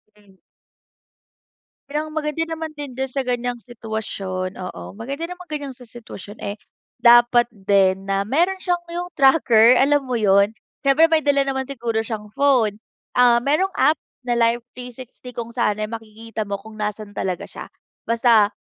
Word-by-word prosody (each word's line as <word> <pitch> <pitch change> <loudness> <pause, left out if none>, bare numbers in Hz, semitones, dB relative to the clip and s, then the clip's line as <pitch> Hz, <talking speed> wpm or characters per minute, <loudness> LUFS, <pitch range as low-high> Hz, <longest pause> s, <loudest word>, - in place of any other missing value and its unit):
Hmm. 205 -2 -23 1.5
Bilang 300 +2 -2
maganda 300 +1 -1
naman 320 -1 -5
din 285 -4 -8
di 265 - 0
sa 265 +1 -3
ganiyang, 245 -1 -2
sitwasyon. 210 -5 -5
Oo, 185 +1 -8
maganda 280 +9 -5
namang 360 0 -9
ganiyang 285 -4 -5
sa 250 - -12
sitwasyon, 220 -3 -11
eh, 200 +1 -4 0.4
dapat 240 0 +6
din 195 -1 +2
na 195 0 +1
meron 340 - +1
siyang 355 -2 -1
yung 350 +1 -4
tracker, 255 -5 +5
alam 290 +2 +4
mo 255 -3 -2
'yun. 200 -1 +4 0.3
Siyempre 275 +3 +5
may 320 -1 +3
dala 280 -2 +2
naman 265 -1 -2
siguro 235 -4 -2
siyang 215 -2 -6
phone. 235 -7 +2 0.3
Ah, 245 -1 +5
merong 305 +9 +1
app, 310 - +4 0.3
na 245 - +1
Live 235 0 +2
360 250 0 -10
kung 235 0 -5
saan 210 -4 +1
ay 215 - -1
makikita 220 -1 -7
mo 200 - -1
kung 220 +2 -13
nasaan 210 0 -4
talaga 185 -3 -3
siya. - - -10 0.4
Basta, 230 -3 +4
240 Hz, 160 wpm, -21 LUFS, 215-275 Hz, 1.5 s, dapat